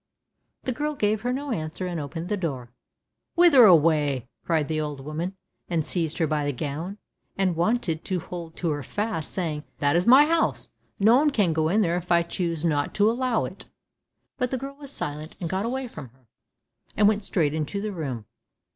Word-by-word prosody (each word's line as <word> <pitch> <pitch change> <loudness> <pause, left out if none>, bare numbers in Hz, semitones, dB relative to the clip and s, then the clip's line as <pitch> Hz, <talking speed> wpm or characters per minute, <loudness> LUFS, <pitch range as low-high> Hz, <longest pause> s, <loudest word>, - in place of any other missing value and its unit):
The 255 - -1
girl 300 +4 -2
gave 215 -3 +1
her 245 +2 -1
no 280 +2 -3
answer, 160 -1 -3
and 175 -2 -3
opened 165 +4 -5
the 210 - 0
door. 135 - -4 0.6
"Whither 335 -8 +8
away," 150 - +4
cried 160 -4 +1
the 155 -1 -1
old 150 -2 -4
woman, 165 +5 -4 0.3
and 165 -3 0
seized 165 -3 -2
her 165 - +2
by 150 -1 0
the 145 - 0
gown, 155 +8 -4 0.4
and 190 -3 +1
wanted 170 -2 0
to 185 -2 -1
hold 170 -1 -8
her 155 -4 0
fast, 205 0 -3
saying, 155 -5 -2
"That 145 +1 +2
is 175 +4 +2
my 265 +4 +8
house; 330 +1 0 0.3
no 220 +5 +6
one 295 +2 +4
can 205 - +2
go 160 0 +1
in 210 +5 +3
there 175 -3 +1
if 180 0 -6
I 170 0 +5
choose 170 -1 -2
not 145 -3 0
to 210 +1 +4
allow 245 -1 0
it." - - -9 0.7
But 250 -1 +1
the 260 - -1
girl 275 +2 -6
was 280 -1 -11
silent, 150 - -5
got 190 +6 -1
away 260 +1 -2
from 160 - -9
her, 125 +2 -27 0.7
and 210 - +6
went 210 0 +2
straight 160 -7 0
into 160 +6 -2
the 210 +1 -3
room. 135 - -4
175 Hz, 195 wpm, -25 LUFS, 155-215 Hz, 0.7 s, Whither